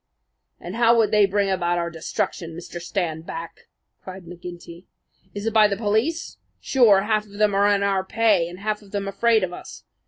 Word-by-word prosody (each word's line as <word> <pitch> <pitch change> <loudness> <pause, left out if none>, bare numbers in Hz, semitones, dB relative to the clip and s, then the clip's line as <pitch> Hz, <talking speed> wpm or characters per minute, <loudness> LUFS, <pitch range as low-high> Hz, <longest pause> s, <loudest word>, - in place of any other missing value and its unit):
"And 180 +5 -7
how 235 0 +4
would 225 -2 +3
they 210 -2 +5
bring 200 0 0
about 175 -2 0
our 170 0 -2
destruction, 165 0 -4
Mr. 175 0 -8
Standback?" 165 -2 -5 0.4
cried 185 -1 -9
McGinty. 175 0 -10 0.5
"Is 205 +1 -5
it 225 - -1
by 215 -1 +6
the 200 -1 -2
police? 225 +10 -1 0.2
Sure, 225 -7 +4
half 215 0 0
of 200 - -17
them 210 0 +1
are 200 +1 +3
in 200 -1 +2
our 195 -1 +1
pay 200 -4 +2
and 175 - -10
half 215 0 -2
of 205 - -17
them 200 0 -3
afraid 220 +2 +2
of 180 -1 -3
us. - - -10
200 Hz, 190 wpm, -23 LUFS, 175-215 Hz, 0.5 s, by